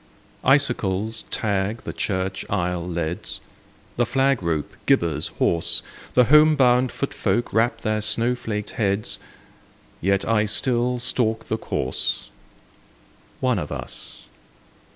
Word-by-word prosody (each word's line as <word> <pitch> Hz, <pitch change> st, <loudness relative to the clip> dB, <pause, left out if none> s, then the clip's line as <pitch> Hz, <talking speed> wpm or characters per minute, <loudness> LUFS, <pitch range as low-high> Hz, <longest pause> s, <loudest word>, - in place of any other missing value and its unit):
Icicles 110 Hz, -6 st, +2 dB
tag 105 Hz, +2 st, -1 dB
the -, -, -5 dB
church 95 Hz, -1 st, -2 dB
aisle 90 Hz, -2 st, -1 dB
leads, 85 Hz, +2 st, -3 dB, 0.6 s
The 120 Hz, -, +3 dB
flag 135 Hz, -1 st, +2 dB
rope 80 Hz, -4 st, -2 dB
gibbers 80 Hz, -3 st, +2 dB
hoarse, 85 Hz, -1 st, +2 dB, 0.3 s
The 125 Hz, -, +7 dB
home 150 Hz, +4 st, +6 dB
bound 125 Hz, -2 st, +4 dB
foot 140 Hz, -, -3 dB
folk 120 Hz, -, -1 dB
wrap 115 Hz, 0 st, +2 dB
their 110 Hz, 0 st, 0 dB
snow 115 Hz, +3 st, +1 dB
flaked 105 Hz, -4 st, -4 dB
heads, 100 Hz, -1 st, -1 dB, 0.8 s
Yet 100 Hz, +2 st, +1 dB
I 110 Hz, -1 st, +2 dB
still 125 Hz, +2 st, +2 dB
stalk 115 Hz, -2 st, 0 dB
the 110 Hz, -, 0 dB
course,— -, -, -2 dB, 1.1 s
One 125 Hz, -5 st, +2 dB
of 75 Hz, -, -5 dB
us -, -, -6 dB
110 Hz, 120 wpm, -23 LUFS, 95-125 Hz, 1.1 s, The